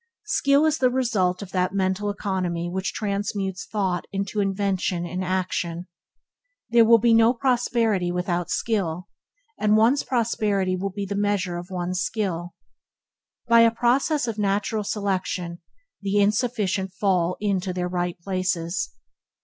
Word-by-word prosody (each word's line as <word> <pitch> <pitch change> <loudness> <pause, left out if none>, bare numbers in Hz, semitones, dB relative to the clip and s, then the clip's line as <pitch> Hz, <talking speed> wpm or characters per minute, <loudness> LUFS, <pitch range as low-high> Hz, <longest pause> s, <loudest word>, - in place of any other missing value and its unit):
Skill 285 -3 +3
is 315 0 +1
the 255 - +4
result 210 -8 0
of 190 - -11
that 185 +1 0
mental 190 +1 0
economy 185 -4 -2
which 185 +2 -2
transmutes 200 -2 -3
thought 190 -5 -1
into 200 +2 -2
invention 195 -3 0
and 180 +2 -3
action. 180 -2 -2 0.9
There 235 -1 +6
will 230 +1 +7
be 230 +1 +3
no 225 +2 +5
prosperity 230 -7 +1
without 175 -1 -1
skill, 185 -5 -1 0.5
and 215 0 +3
one's 240 +6 +4
prosperity 210 -6 0
will 195 +2 -2
be 200 +1 -5
in 195 - -6
the 200 - -2
measure 200 -4 0
of 175 +2 -10
one's 180 0 -2
skill. 175 -6 -2 0.9
By 235 0 +6
a 230 - +7
process 245 +5 +1
of 220 -2 -3
natural 210 +2 0
selection, 185 -4 -2 0.4
the 200 0 0
inefficient 205 -3 0
fall 180 -3 +1
in 200 -2 +1
to 185 0 -3
their 180 0 -2
right 175 0 -2
places. 185 -1 -2
195 Hz, 145 wpm, -24 LUFS, 180-220 Hz, 0.9 s, will